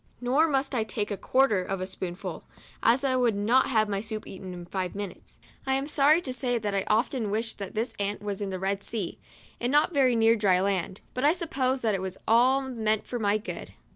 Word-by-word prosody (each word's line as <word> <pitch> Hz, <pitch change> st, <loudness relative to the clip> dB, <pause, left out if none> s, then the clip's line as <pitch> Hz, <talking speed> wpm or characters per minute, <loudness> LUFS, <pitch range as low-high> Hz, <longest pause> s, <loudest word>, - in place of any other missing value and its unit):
Nor 265 Hz, +6 st, +3 dB
must 275 Hz, -2 st, 0 dB
I 235 Hz, -4 st, +1 dB
take 210 Hz, -1 st, -3 dB
a -, -, 0 dB
quarter 255 Hz, -2 st, +2 dB
of 195 Hz, +1 st, -3 dB
a 185 Hz, -, -2 dB
spoonful, 185 Hz, -1 st, -6 dB, 0.4 s
as 245 Hz, +4 st, +4 dB
I 265 Hz, -2 st, +2 dB
would 245 Hz, -4 st, +2 dB
not 230 Hz, +6 st, +3 dB
have 220 Hz, -4 st, +3 dB
my 200 Hz, -1 st, -2 dB
soup 215 Hz, 0 st, -6 dB
eaten 190 Hz, -1 st, -8 dB
in 175 Hz, -1 st, -8 dB
five 185 Hz, 0 st, -3 dB
minutes. 200 Hz, -2 st, -8 dB, 0.3 s
I 265 Hz, -, +2 dB
am 270 Hz, +1 st, -1 dB
sorry 295 Hz, +2 st, +4 dB
to 260 Hz, -6 st, -4 dB
say 250 Hz, -1 st, 0 dB
that 210 Hz, -3 st, -2 dB
I 195 Hz, -1 st, 0 dB
often 225 Hz, 0 st, +1 dB
wished 220 Hz, +2 st, -2 dB
that 200 Hz, 0 st, -6 dB
this 225 Hz, +2 st, -1 dB
aunt 205 Hz, +1 st, -1 dB
was 205 Hz, -1 st, -3 dB
in 200 Hz, -, -2 dB
the 190 Hz, -, -3 dB
Red 195 Hz, +1 st, -1 dB
Sea, 205 Hz, -6 st, -3 dB, 0.4 s
and 240 Hz, +1 st, -1 dB
not 295 Hz, +5 st, +3 dB
very 260 Hz, -4 st, +4 dB
near 225 Hz, 0 st, +5 dB
dry 195 Hz, -4 st, +3 dB
land; 190 Hz, -1 st, -1 dB
but 255 Hz, -, -3 dB
I 295 Hz, +2 st, +5 dB
suppose 270 Hz, -7 st, -1 dB
that 220 Hz, -2 st, +2 dB
it 195 Hz, -, -1 dB
was 190 Hz, 0 st, -4 dB
all 255 Hz, +4 st, +4 dB
meant 220 Hz, -5 st, -1 dB
for 245 Hz, -, -4 dB
my 205 Hz, -1 st, +2 dB
good. 215 Hz, -, -7 dB
220 Hz, 230 wpm, -27 LUFS, 200-255 Hz, 0.4 s, near